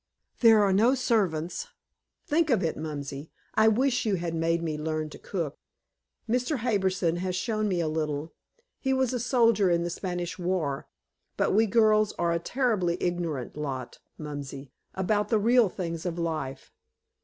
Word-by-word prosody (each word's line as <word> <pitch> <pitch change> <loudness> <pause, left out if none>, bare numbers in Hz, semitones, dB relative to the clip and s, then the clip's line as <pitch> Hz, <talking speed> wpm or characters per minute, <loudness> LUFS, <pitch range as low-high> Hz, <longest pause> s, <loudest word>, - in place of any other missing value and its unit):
There 225 -3 +7
are 195 -1 +3
no 230 +7 +4
servants 200 - 0 0.6
think 315 +1 +2
of 230 -8 +3
it, 165 - 0
Mumsy. 145 -1 -6 0.2
I 220 0 +4
wish 250 +3 +2
you 210 -3 +1
had 170 -2 -3
made 165 +1 0
me 160 -2 -2
learn 155 0 -3
to - - -10
cook. 165 -7 -4 0.7
Mr. 250 +5 0
Harbison 190 -7 0
has 185 0 -2
shown 215 +2 -1
me 185 -3 0
a 165 - 0
little 155 0 -2 0.5
he 265 -1 0
was 260 -1 +1
a 250 - -1
soldier 230 -5 +3
in 170 0 +2
the 175 - -2
Spanish 175 0 -4
War 175 -6 -1 0.5
but - - +2
we 220 +3 +4
girls 215 -1 +4
are 170 -1 0
a 170 - +1
terribly 200 -5 0
ignorant 170 -7 -2
lot, 135 -4 -5 0.2
Mumsy, 140 -3 -7 0.2
about 205 +2 0
the 225 - +3
real 230 0 +4
things 170 -3 -4
of 170 -1 -3
life. 155 -6 -4
180 Hz, 165 wpm, -27 LUFS, 160-220 Hz, 0.7 s, There